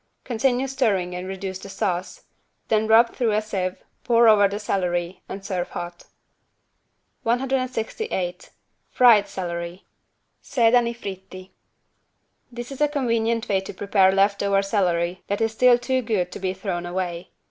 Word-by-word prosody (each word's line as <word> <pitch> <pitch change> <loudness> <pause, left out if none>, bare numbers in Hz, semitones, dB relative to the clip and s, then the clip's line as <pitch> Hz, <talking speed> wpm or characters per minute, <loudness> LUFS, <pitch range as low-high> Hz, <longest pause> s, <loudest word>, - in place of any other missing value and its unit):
Continue 250 +2 0
stirring 215 -10 0
and 180 +1 -5
reduce 190 0 -5
the 195 - -10
sauce. 185 -2 -3 0.5
Then 220 0 +2
rub 230 +2 +5
through 235 -4 0
a 210 - +3
sieve, 185 -3 -3 0.2
pour 235 -1 +4
over 205 -2 +6
the 200 +1 -4
celery 180 -3 -2
and 195 0 -7
serve 185 -3 -2
very - - -19
hot. 175 0 -6 1.2
168 245 - -2 0.4
FRIED 225 -5 +5
CELERY 175 -1 -5 0.6
(Sedani 235 -1 +3
fritti) 190 -3 -9 1.0
This 240 +2 -7
is 275 - -7
a 295 - +5
convenient 230 -5 0
way 195 -2 +1
to 190 - -9
prepare 195 -1 +3
left 200 +1 +2
over 200 0 +2
celery 180 -3 0
that 200 - -1
is 225 -1 +1
still 245 +2 +5
too 255 +1 -1
good 205 -7 -1
to - - -7
be 185 0 -2
thrown 180 -2 -4
away. 175 -1 -4
200 Hz, 145 wpm, -23 LUFS, 185-235 Hz, 1.2 s, over